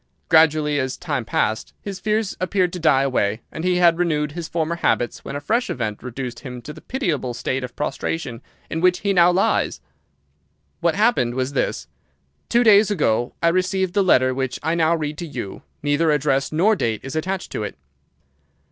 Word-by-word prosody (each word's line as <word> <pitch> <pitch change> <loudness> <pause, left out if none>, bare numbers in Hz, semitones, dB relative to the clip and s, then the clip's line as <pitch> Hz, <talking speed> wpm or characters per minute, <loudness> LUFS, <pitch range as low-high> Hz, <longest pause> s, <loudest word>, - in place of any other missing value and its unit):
Gradually, 155 -2 +4
as 130 -1 -2
time 145 -8 -3
passed, 110 0 -1
his 195 -2 -6
fears 215 +1 -1
appeared 185 -1 0
to 180 - -4
die 155 -5 +4
away, 110 -5 0
and 160 - -6
he 180 0 +2
had 175 -1 +4
renewed 150 -4 0
his 165 +1 -5
former 165 0 -2
habits, 120 -7 0
when - - -6
a - - -2
fresh 230 +11 0
event 110 -4 -3
reduced 125 -1 -6
him 125 -3 -8
to 150 - -7
the - - -13
pitiable 160 - -2
state 130 +1 -2
of 125 -1 -7
prostration 140 -4 -3 0.3
in 160 - -3
which 180 0 +3
he 200 -1 +1
now 175 -1 +6
lies. 185 +2 +1 1.0
"What 170 -1 +1
happened 205 - +2
was 130 +1 -2
this. 135 - -1 0.6
Two 240 +1 +4
days 215 -2 +6
ago 120 - 0
I 170 - +5
received 185 +1 0
the 200 - +3
letter 130 -8 +4
which 130 -1 -2
I 160 - +1
now 165 0 +3
read 150 -2 -4
to 170 - -5
you. 120 -9 -6 0.2
Neither 145 +3 +2
address 140 -2 +1
nor 190 +8 +3
date 115 - -1
is 135 +3 -6
attached 185 +4 -3
to - - -3
it. 105 - -5
155 Hz, 190 wpm, -22 LUFS, 130-180 Hz, 1.0 s, now